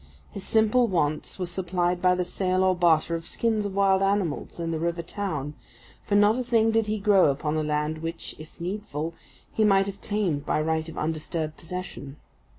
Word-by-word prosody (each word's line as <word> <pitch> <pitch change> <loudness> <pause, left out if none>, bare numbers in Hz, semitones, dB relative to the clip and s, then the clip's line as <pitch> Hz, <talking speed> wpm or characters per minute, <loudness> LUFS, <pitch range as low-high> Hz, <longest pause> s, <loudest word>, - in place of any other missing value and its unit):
His 200 - -7
simple 225 +2 +3
wants 155 -6 -1
were 185 - -2
supplied 180 0 -1
by 180 0 +4
the 180 - 0
sale 185 +1 0
or 185 -1 +3
barter 170 -2 +3
of 165 0 -4
skins 220 -3 0
of 195 - -7
wild 195 -1 +3
animals 195 -6 -1
in 165 -1 -2
the 160 - -2
river 170 +1 -1
town, 155 -7 -4 0.5
for 205 - 0
not 205 +4 +5
a - - -1
thing 225 -2 +3
did 225 -1 +1
he 215 +1 0
grow 195 -5 +4
upon 150 +2 -1
the 155 - 0
land 150 +1 -1
which, 165 +1 -5
if 155 +1 -13
needful, 170 -4 -4 0.4
he 220 - +2
might 195 -2 +4
have 200 0 -7
claimed 195 -9 -1
by - - 0
right 160 +1 -1
of 165 - -10
undisturbed 155 0 -3
possession. 165 -5 -7
180 Hz, 195 wpm, -26 LUFS, 160-200 Hz, 0.5 s, not